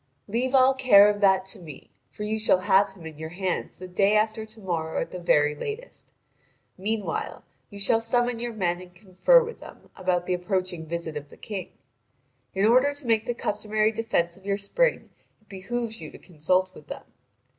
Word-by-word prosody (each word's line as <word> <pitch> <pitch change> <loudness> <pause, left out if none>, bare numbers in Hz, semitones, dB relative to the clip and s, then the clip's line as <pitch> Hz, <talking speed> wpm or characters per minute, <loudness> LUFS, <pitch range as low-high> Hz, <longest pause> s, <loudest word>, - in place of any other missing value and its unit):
"Leave 250 +5 0
all 260 0 +6
care 245 -6 +7
of 205 0 -6
that 190 -1 +4
to 190 +1 -7
me; 155 -6 -12 0.2
for 210 - -8
you 215 +1 -1
shall 200 -4 +3
have 195 +2 +4
him 180 -4 -14
in 155 -2 -9
your 160 0 -5
hands 185 +2 -3
the 185 - -8
day 195 +3 +3
after 220 +1 0
to 220 +1 -14
morrow 165 -5 -2
at - - -4
the 180 - -6
very 150 -4 +3
latest. 435 - -8 0.6
Meanwhile 200 -2 -3 0.3
you 205 - -11
shall 200 +3 +2
summon 240 +1 0
your 240 0 -3
men 180 -5 -1
and 180 -1 -14
confer 200 - +4
with 465 0 -8
them - - -14
about 180 -2 0
the 185 - 0
approaching 180 -2 -2
visit 165 -1 -4
of 145 -1 -6
the - - -15
King. 195 -5 -6 0.9
In 195 +2 +2
order 255 +6 +4
to 285 -2 -11
make 225 -1 +1
the 240 - -1
customary 215 0 0
defence 215 -7 -1
of 190 - -19
your 200 0 -1
spring - - 0 0.3
it 215 - -33
behoves 225 +4 -4
you - - -7
to - - -12
consult 185 +3 0
with - - -15
them. - - -7
200 Hz, 200 wpm, -26 LUFS, 180-225 Hz, 0.9 s, care